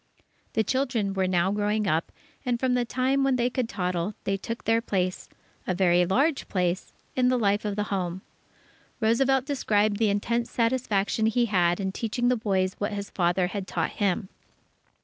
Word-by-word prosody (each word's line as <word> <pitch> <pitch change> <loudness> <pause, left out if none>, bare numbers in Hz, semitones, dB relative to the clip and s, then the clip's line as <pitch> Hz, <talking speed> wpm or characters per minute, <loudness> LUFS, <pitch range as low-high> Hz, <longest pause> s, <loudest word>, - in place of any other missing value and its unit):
The 220 - +2
children 250 -5 0
were 190 -1 0
now 180 +1 +2
growing 210 +1 0
up, 165 -2 0 0.3
and 245 -3 0
from 255 0 +1
the 245 -1 +1
time 260 +3 +1
when 270 -1 +3
they 245 0 +1
could 250 -2 -1
toddle, 180 0 -2
they 195 - 0
took 230 +4 -5
their 225 0 +2
place 185 -5 -2 0.4
a 185 - 0
very 175 -1 +3
large 275 - +1
place 180 -1 -1 0.2
in 255 -1 +3
the 255 - +2
life 205 -2 +1
of 205 -1 -1
the 210 - 0
home. 185 -1 -2 0.8
Roosevelt 255 +4 +2
described 215 -7 +1
the 220 -1 +2
intense 235 +4 0
satisfaction 230 -3 +1
he 235 +2 +2
had 175 -4 +2
in 190 -1 -1
teaching 240 +4 -1
the 250 - +3
boys 190 -4 0
what 205 +1 -2
his 200 0 -5
father 175 0 +1
had 195 +1 -4
taught 165 -2 -1
him. 195 -1 -1
210 Hz, 180 wpm, -26 LUFS, 190-240 Hz, 0.8 s, when